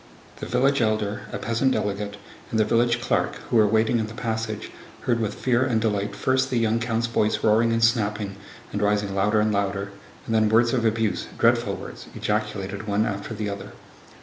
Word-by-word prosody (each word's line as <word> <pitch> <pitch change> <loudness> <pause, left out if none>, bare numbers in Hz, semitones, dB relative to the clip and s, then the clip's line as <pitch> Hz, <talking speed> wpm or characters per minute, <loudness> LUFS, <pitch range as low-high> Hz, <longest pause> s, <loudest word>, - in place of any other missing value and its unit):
The - - -6
village 135 +2 +2
elder, 110 -1 -1
a - - -3
peasant 115 +4 +1
delegate, 100 0 -2 0.3
and 110 - 0
the 110 - +4
village 120 +2 +2
clerk, 110 - 0 0.2
who 120 - +4
were 110 -1 +6
waiting 110 +2 +2
in 110 - -1
the 110 - -9
passage, 110 -2 -3 0.3
heard 120 -2 +1
with 105 -2 -2
fear 125 -1 +1
and 125 -4 +1
delight 105 -2 -1
first 130 0 +1
the 125 - 0
young 115 0 +2
count's 115 0 0
voice 110 -2 0
roaring 110 +2 +4
and 115 0 +1
snapping 105 -3 +1 0.4
and 105 - -2
rising 105 -1 +1
louder 105 +2 +2
and 105 0 +2
louder, 100 -1 -1 0.3
and 115 - -3
then 110 -1 +3
words 115 +2 +4
of 120 -3 +1
abuse, 110 -1 0
dreadful - - +3
words, - - -9
ejaculated 105 -1 -2
one 105 +1 +1
after 100 +1 -4
the 105 -1 -3
other. 100 0 -6
110 Hz, 195 wpm, -24 LUFS, 105-115 Hz, 0.4 s, were